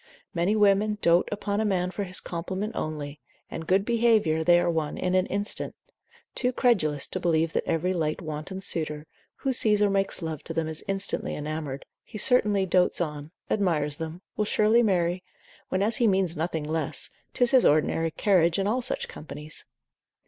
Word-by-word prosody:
Many 175 +5 +1
women 210 0 +3
dote 170 +1 +4
upon 205 0 -1
a - - +1
man 185 -3 0
for 200 +1 -3
his 185 0 -4
compliment 190 +6 -4
only, 150 -2 -4 0.3
and 160 - -6
good 195 +2 +3
behaviour, 220 -9 +2
they 175 +1 +5
are 175 - 0
won 160 -3 -1
in 180 0 -1
an 185 0 +2
instant; 205 +1 -2 0.6
too 250 -1 0
credulous 175 - +1
to 185 - -2
believe 165 -2 +1
that - - -1
every 170 +3 0
light 155 -3 -1
wanton 155 +3 -6
suitor, 155 -4 -1 0.3
who 270 - -1
sees 215 -3 +4
or 205 -1 +3
makes 195 -2 -1
love 160 -3 -4
to 165 - -4
them, 165 -1 0
is 160 0 -5
instantly 195 0 -1
enamoured, 150 -2 -5 0.2
he - - -9
certainly 210 -4 +3
dotes 180 0 +2
on, 150 -3 -3 0.2
admires 155 -8 0
them, 165 +3 -6
will 210 - 0
surely 215 +3 +3
marry, 180 -4 +1 0.5
when 185 +1 0
as 220 +2 +2
he 235 - +3
means 190 -4 +1
nothing 160 0 -2
less, 155 -1 -1 0.2
'tis 245 -1 +3
his 260 -2 +6
ordinary 155 +2 +2
carriage 170 -1 +2
in 195 - 0
all 235 +5 +1
such - - -1
companies. 150 0 -8
180 Hz, 180 wpm, -26 LUFS, 160-205 Hz, 0.6 s, his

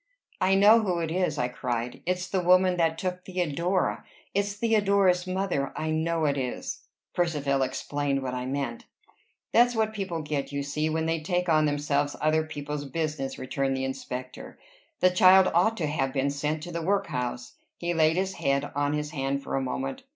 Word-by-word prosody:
"I 190 +1 +4
know, 210 +4 +7
who 190 -6 0
it 165 -1 -2
is!" 180 +1 0
I 125 - +1
cried. 120 -1 -4
"It's 180 0 -1
the 190 - 0
woman 180 +1 +4
that 165 -1 +1
took 180 +1 -3
Theodora! 180 0 -1 0.3
It's 200 +1 0
Theodora's 200 -5 +2
mother! 185 -7 -1
I 155 0 -2
know 160 0 0
it 140 -1 +1
is!" 125 -2 -4 0.3
Percivale 145 -6 0
explained 135 +1 -1
what 130 -1 -3
I 125 0 -3
meant. 135 -3 -3 0.7
"That's 240 +1 +4
what 220 -1 +1
people 190 -6 -3
get, 150 -2 -3
you 140 0 -2
see, 150 +2 -1
when 160 +1 -1
they 165 0 0
take 180 +2 -1
on 155 -1 +4
themselves 145 0 0
other 155 +1 +2
people's 150 -1 -5
business," 150 -1 -3
returned 135 +1 -1
the 130 - -1
inspector. 130 -1 -6 0.4
"That 185 0 +4
child 185 +1 +7
ought 220 +7 +3
to 165 - -1
have 135 -3 -1
been 140 0 +1
sent 150 +2 -2
to 175 - -6
the 170 0 -3
workhouse." 125 -10 -2 0.2
He 175 0 -2
laid 160 -1 +3
his 190 +1 -1
head 140 -2 0
on 145 0 0
his 150 0 -2
hand 140 -1 -2
for - - -3
a 135 - +1
moment. 135 +1 -3
155 Hz, 185 wpm, -27 LUFS, 140-180 Hz, 0.7 s, know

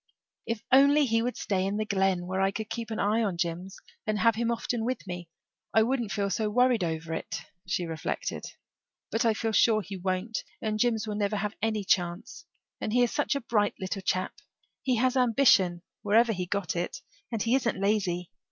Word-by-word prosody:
"If 230 -2 -2
he 265 +1 +8
would 280 - +6 0.4
only - - 0
stay 190 -2 -1
in 195 +2 -1
the 215 - -1
Glen, 190 -3 +1
where 190 +1 -1
I 195 - +3
could 215 +2 -5
keep 230 0 -4
an 220 - -3
eye 215 +3 +2
on 200 -6 -1
Jims 175 +2 -3 0.3
and 215 -1 +1
have 230 +2 +4
him 230 +2 -1
often 235 0 -1
with 255 -1 -2
me 180 -2 -6 0.5
I 220 - +6
wouldn't 240 -3 -1
feel 200 -1 -1
so 215 +3 0
worried 245 -1 +3
over 160 -1 -3
it," - - -4 0.2
she 180 -1 -1
reflected. 165 -1 -3 0.7
"But 225 - +1
I 225 -2 +3
feel 225 0 -1
sure 215 0 +4
he 195 -1 -7
won't 185 +4 -2 0.2
and 215 -1 -2
Jims 225 -1 +2
will 210 - -2
never 205 0 0
have 210 +1 -2
any 215 -2 0
chance. 190 - -1 0.3
And - - -3
he 245 0 +5
is 240 - +1
such 295 0 +1
a 280 - -1
bright 210 -3 +1
little 190 0 -3
chap 185 0 -1 0.5
he 255 -2 +1
has 255 +3 +2
ambition, 230 -8 +4 0.2
wherever 225 +3 +4
he 180 -2 -3
got 185 -3 -2
it 175 +1 -3 0.3
and 225 -3 -1
he 230 - +1
isn't 245 -6 +1
lazy. 190 -4 0
210 Hz, 205 wpm, -28 LUFS, 185-230 Hz, 0.7 s, he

